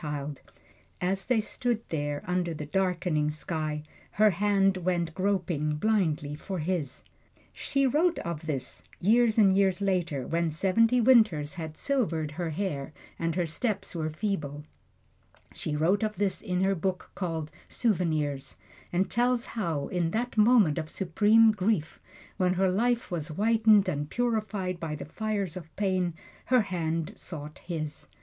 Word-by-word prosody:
And 145 -1 -4 0.6
as 190 +2 -1
they 250 -3 +2
stood 230 +1 -2
there, 145 -2 -2
under 180 -2 -1
the 150 - -5
darkening 175 -3 0
sky, 155 0 -3 0.3
her 215 0 +5
hand 195 0 +2
went 175 -2 -1
groping 175 -6 0
blindly 155 -6 0
for 185 +5 -5
his. 160 -5 -2 0.5
She 275 0 0
wrote 325 +6 +2
of 165 -2 -5
this, 135 -5 -4 0.2
years 225 +3 +3
and 195 -3 +6
years 195 -1 +3
after, 175 -9 0
when 170 +2 0
seventy 225 +9 +3
winters 215 - +4
had 160 -3 -6
silvered 170 - 0
her 165 +2 -3
hair 155 -5 -3 0.3
and 165 -1 -1
her 180 -1 +1
steps 210 +7 -2
were 160 -2 -2
feeble 155 -5 -3 0.9
she 150 - -3
wrote 170 +8 +2
of 215 -1 -1
this, 200 -2 0
in 180 0 -1
her 195 +1 +3
book 185 0 -3
called, 165 -4 -3 0.2
"Souvenirs," 155 - -1 0.3
and 185 +2 +1
tells 245 +1 +1
how, 165 -10 -2
in 175 -2 0
that 240 +7 -2
moment 215 -8 +5
of 155 -1 -5
supreme 215 +6 +4
grief, 195 -6 -1 0.4
when 185 -1 +2
her 190 0 +2
life 235 +3 0
was 160 -4 -2
whitened 215 +3 +4
and 150 -4 -2
purified 215 -6 -1
by 160 -2 -3
the 150 - -7
fires 200 +1 -2
of 165 -3 -9
pain, 185 -4 0 0.3
her 255 -1 +4
hand 165 -5 -2
sought 150 -3 -7
his. 155 -4 -5
180 Hz, 150 wpm, -28 LUFS, 155-210 Hz, 0.9 s, and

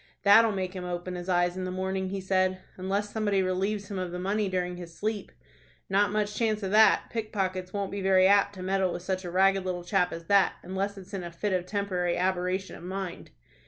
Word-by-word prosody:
"That'll 220 +2 +7
make 190 -2 -3
him 185 - -5
open 180 0 -4
his 180 +1 -6
eyes 175 0 +2
in 185 - -4
the 185 - -3
morning," 190 +1 -2
he 195 +1 -3
said. 185 0 +1 0.2
"Unless 200 +3 -2
somebody 205 -3 +1
relieves 195 +3 -1
him 195 - -3
of 180 -1 -3
the 180 - -4
money 200 +3 0
during 180 -1 -2
his 170 -2 -9
sleep." 215 -1 -3 0.6
"Not 205 +1 +3
much 210 0 0
chance 215 -1 0
of 190 - -2
that. 220 +1 +6
Pickpockets 190 -5 -2
won't 200 -1 -3
be 200 - -4
very 190 -1 +4
apt 200 +1 +4
to 185 - -7
meddle 190 -1 +1
with 175 - -5
such 185 0 -2
a - - -4
ragged 195 +2 +3
little 180 -1 -3
chap 180 0 +1
as 165 0 -7
that, 200 +2 +4
unless 195 +2 -3
it's 195 +1 -12
in 190 -2 -3
a 170 - -6
fit 195 +4 -2
of 180 -1 -1
temporary 185 -4 -1
aberration 185 +1 -1
of - - -12
mind." 185 -1 -5
190 Hz, 225 wpm, -28 LUFS, 180-200 Hz, 0.6 s, That'll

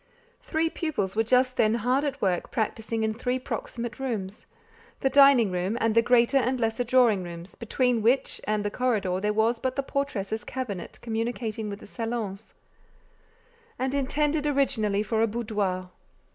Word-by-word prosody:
Three 320 +1 0
pupils 210 - -2
were 220 - +3
just 255 +3 +2
then 215 0 +3
hard 250 +5 +1
at 280 -2 -2
work 180 -3 0
practising 225 -1 -2
in 220 0 0
three 250 +3 -1
proximate 240 -1 -5
rooms—the 225 +2 -5
dining 275 -6 +6
room 180 +5 -1
and 225 -2 +2
the 230 - +5
greater 240 +2 +4
and 255 0 +1
lesser 225 +1 0
drawing 240 -5 +4
rooms, 175 +1 -8
between 245 0 0
which 240 +5 +2
and 210 -1 0
the 205 - -1
corridor 205 -8 0
there 210 +2 0
was 225 +2 +1
but 260 +1 -2
the 275 - -1
portress's 220 -7 -2
cabinet 220 -9 -5
communicating 225 -1 -3
with 200 0 -7
the - - -10
salons, 225 -2 -5 1.2
and 260 +1 -1
intended 295 +2 0
originally 225 -8 +1
for 220 +1 0
a 225 - +4
boudoir. 205 -5 -2
230 Hz, 160 wpm, -27 LUFS, 210-255 Hz, 1.2 s, dining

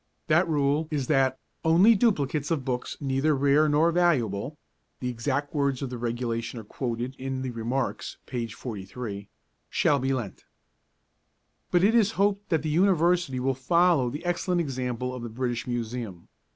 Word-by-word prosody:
That 170 +3 +3
rule 145 +1 +1
is 145 -4 -1
that 135 -1 +2 0.3
only 175 +8 +6
duplicates 150 - +1
of 150 -6 -1
books 125 -1 -3
neither 140 +2 +1
rare 140 +3 +3
nor 155 +3 +3
valuable 145 - +1 0.4
(the 125 - -2
exact 125 +5 -2
words 140 -3 0
of 130 - -4
the 125 - -4
regulation 120 0 -3
are - - -8
quoted 120 +3 -4
in 130 0 -3
the 130 - -3
'Remarks,' 120 +3 -3
p. 120 -3 -3
43) 105 -2 -7 0.4
shall 145 -2 +2
be 135 +1 0
lent. 120 -8 -4 1.2
But 175 0 +3
it 210 +3 +5
is 230 -4 +5
to 225 - -5
be - - -15
hoped 200 +1 +1
that 160 -4 +1
the 155 - -1
University 175 -4 +2
will 135 +1 +1
follow 160 0 +3
the 145 +7 -7
excellent 175 0 0
example 125 -4 -2
of 125 - -6
the 120 - -5
British 120 +1 -3
Museum. 115 -6 -4
135 Hz, 165 wpm, -27 LUFS, 120-160 Hz, 1.2 s, only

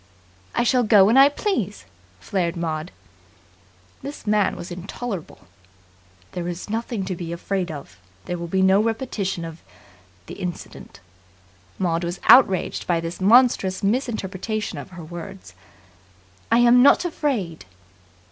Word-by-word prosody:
"I - - +2
shall 250 +1 +3
go 210 -4 +6
when 220 +5 +3
I 275 +1 +8
please," 265 - -3 0.3
flared 170 - -2
Maud. 160 0 -3 1.1
This 285 -4 -8
man 210 -1 +2
was 175 - -8
intolerable. 190 +1 -6 0.9
"There 175 -1 -4
is 175 +3 -6
nothing 225 -2 -3
to 185 -1 -3
be 170 -1 -6
afraid 180 +1 -3
of. 140 - -9 0.3
There 175 -1 -4
will 170 - -5
be 190 +2 +1
no 190 +2 +5
repetition 215 -6 -2
of 165 0 -9 0.6
the - - -9
incident." 180 -2 -7 0.8
Maud 170 -2 0
was 175 +2 -4
outraged 195 -8 +5
by 170 -2 +2
this 165 +2 -6
monstrous 205 -3 +4
misinterpretation 215 -2 -2
of - - -9
her 180 -3 -10
words. 175 - -9 1.0
"I 230 - +5
am 240 +1 +6
not 285 +6 +5
afraid!" 245 - -2
190 Hz, 135 wpm, -23 LUFS, 175-230 Hz, 1.1 s, I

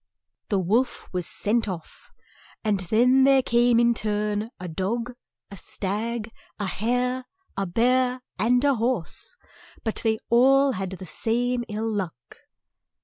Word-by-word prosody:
The 200 - +2
wolf 215 +8 0
was 180 -2 -2
sent 225 +2 +1
off, 170 -4 -8 0.5
and 210 -3 +1
then 240 +8 +4
there 270 -1 +5
came 240 0 +3
in 235 0 +4
turn, 210 -1 -1
a 180 - -6
dog, 225 +9 -2 0.4
a 200 - -9
stag, 215 +5 -3 0.3
a 205 - -2
hare, 250 +6 -1 0.3
a 195 0 -1
bear, 250 +5 +2 0.2
and 245 +4 +3
a 285 -1 +4
horse, 230 -7 -1 0.5
but 220 - -2
they 220 -1 +1
all 270 +3 +5
had 190 -5 -3
the 190 0 -8
same 240 +8 0
ill 215 +2 -2
luck. 185 - -5
225 Hz, 140 wpm, -25 LUFS, 200-245 Hz, 0.5 s, there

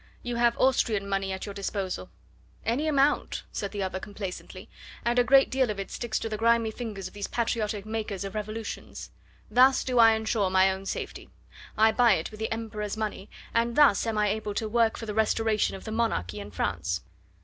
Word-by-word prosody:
"You 245 -1 -3
have 235 0 +3
Austrian 225 -6 +2
money 195 -1 -1
at 190 0 -4
your 200 - -6
disposal." 195 - -4 0.6
"Any 255 +8 0
amount," 285 -1 +2
said 200 -2 -4
the 205 -2 -3
other 190 0 -3
complacently, 195 -2 -7 0.4
"and 240 +1 +3
a - - +5
great 270 +3 +5
deal 260 -2 +2
of 210 -2 -3
it 195 - -5
sticks 235 -3 -2
to - - -3
the 215 -1 -3
grimy 230 -1 +3
fingers 215 -5 -6
of - - -13
these 205 -1 -4
patriotic 220 -3 -1
makers 215 -3 -3
of 195 -1 -6
revolutions. 215 +1 -6 0.4
Thus 260 +2 +5
do 250 -2 +1
I 225 -1 +8
ensure 220 -3 0
my 190 0 +4
own 190 +1 -6
safety. - - -5 0.5
I 220 +1 +6
buy 240 -1 +5
it 165 +1 -2
with 215 - -11
the 220 - -2
Emperor's 215 -2 -4
money, 215 -2 -4 0.2
and 235 0 +1
thus 275 -7 +5
am 220 -1 -1
I 210 -1 +3
able 210 0 -3
to 220 - -1
work 230 0 +2
for 225 - -6
the 210 - -4
restoration 220 -1 +1
of 190 - -9
the 220 - -6
monarchy 220 - -1
in 100 0 -7
France." 85 -2 -2
215 Hz, 205 wpm, -27 LUFS, 200-230 Hz, 0.6 s, I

